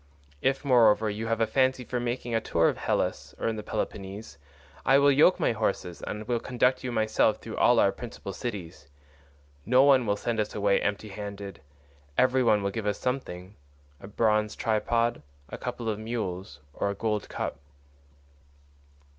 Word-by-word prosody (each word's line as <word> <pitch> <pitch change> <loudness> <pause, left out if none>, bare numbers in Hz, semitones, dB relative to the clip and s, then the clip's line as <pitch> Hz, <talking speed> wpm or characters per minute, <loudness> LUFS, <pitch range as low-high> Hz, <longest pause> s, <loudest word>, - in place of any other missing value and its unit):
If, 135 +2 0
moreover, 110 -4 +4
you 110 +2 -4
have 115 0 0
a - - +5
fancy 130 +1 +1
for 125 0 -3
making 120 0 -3
a 115 - +2
tour 85 -5 +2
in - - -9
Hellas - - -2
or - - -2
in 115 - 0
the 105 - -5
Peloponnese, 95 -7 -5 0.4
I 135 - +5
will 140 0 +5
yoke 150 +6 +5
my - - +2
horses, 100 -5 -2
and 105 0 -6
will 120 -1 0
conduct 125 +2 +1
you 125 - -3
myself 110 -2 +2
through - - -8
all - - +5
our - - +4
principal - - -8
cities. 85 - -6 0.8
No 125 - +5
one 135 -4 +5
will 100 0 +1
send 115 +1 -2
us 105 0 -2
away 100 -1 +2
empty 105 +1 -2
handed; 100 -2 -7 0.6
every 130 +1 +4
one 105 -4 +3
will 100 - 0
give 105 0 -4
us 105 -1 0
something—a 90 - -7
bronze 105 0 +1
tripod, 115 +1 0 0.3
a - - -6
couple 115 - -5
of 110 -1 -1
mules, 95 - -5
or 100 - -1
a 100 - -3
gold 105 0 -2
cup." - - -4
110 Hz, 170 wpm, -27 LUFS, 100-120 Hz, 0.8 s, a